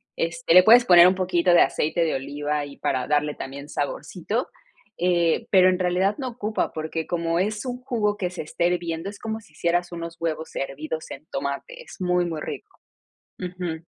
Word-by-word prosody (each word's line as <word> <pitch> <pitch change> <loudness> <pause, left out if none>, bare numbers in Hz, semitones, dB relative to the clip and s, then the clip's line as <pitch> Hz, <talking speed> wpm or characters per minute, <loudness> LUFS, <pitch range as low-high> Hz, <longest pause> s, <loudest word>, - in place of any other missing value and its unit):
este, 165 0 0
le 180 +1 +9
puedes 235 +4 +7
poner 175 -3 +8
un 185 - +3
poquito 180 -1 +2
de 175 - +7
aceite 160 +3 +1
de 160 - 0
oliva 145 +2 -2
ahí, 145 -1 -6
para 130 -2 -1
darle 150 0 +1
también 140 +2 -7
saborcito, - - -3 0.5
eh, 175 -2 +1
pero 185 -1 +6
en 185 0 0
realidad 185 +2 +1
no 265 -3 -3
ocupa, 220 -3 -2
porque 160 +1 -4
como 170 -1 0
es 210 +5 -1
un 250 0 -4
jugo 225 -5 0
que 180 -3 -2
se 180 -2 -6
está 155 +2 -2
hirviendo, 175 0 -1
es 200 - -11
como 220 -1 -4
si 185 - -21
hicieras 175 +2 0
unos 170 0 -6
huevos 160 -1 -3
hervidos 155 +3 -5
en 140 +3 -9
tomate, 140 - -4
es - - -13
muy, 180 -1 +1
muy 160 -3 -4
rico. - - -8 0.6
Ujú. 180 -3 -5
175 Hz, 190 wpm, -24 LUFS, 155-185 Hz, 0.6 s, le